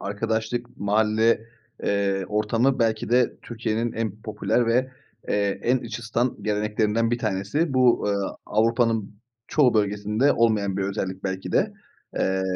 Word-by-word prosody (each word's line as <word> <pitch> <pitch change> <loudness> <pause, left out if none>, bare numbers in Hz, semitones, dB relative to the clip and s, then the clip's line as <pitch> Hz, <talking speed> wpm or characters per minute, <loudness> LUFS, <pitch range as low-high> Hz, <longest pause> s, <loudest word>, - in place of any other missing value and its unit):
arkadaşlık, 110 +4 -3
mahalle, 110 +2 +2 0.4
eee, 100 -1 0
ortamı 115 +5 +1
belki 110 -2 0
de 125 0 +3
Türkiye'nin 115 0 -2
en 110 -2 -4
popüler 115 +2 0
ve, 125 +3 +2 0.4
eee, 100 -1 0
en 125 +2 +2
iç 115 -1 -6
ısıtan 120 +2 -1
geleneklerinden 105 +2 0
bir 120 - 0
tanesi. 110 - -1
Bu, 125 -4 +4
eee, 100 - +1 0.3
Avrupa'nın 115 -1 +1 0.3
çoğu 130 -6 +3
bölgesinde 105 +5 +2
olmayan 105 -4 +1
bir 100 - 0
özellik 95 -1 -3
belki 95 0 -3
de. - - +2 0.5
Eee, 95 0 +1
110 Hz, 135 wpm, -24 LUFS, 100-120 Hz, 0.5 s, Bu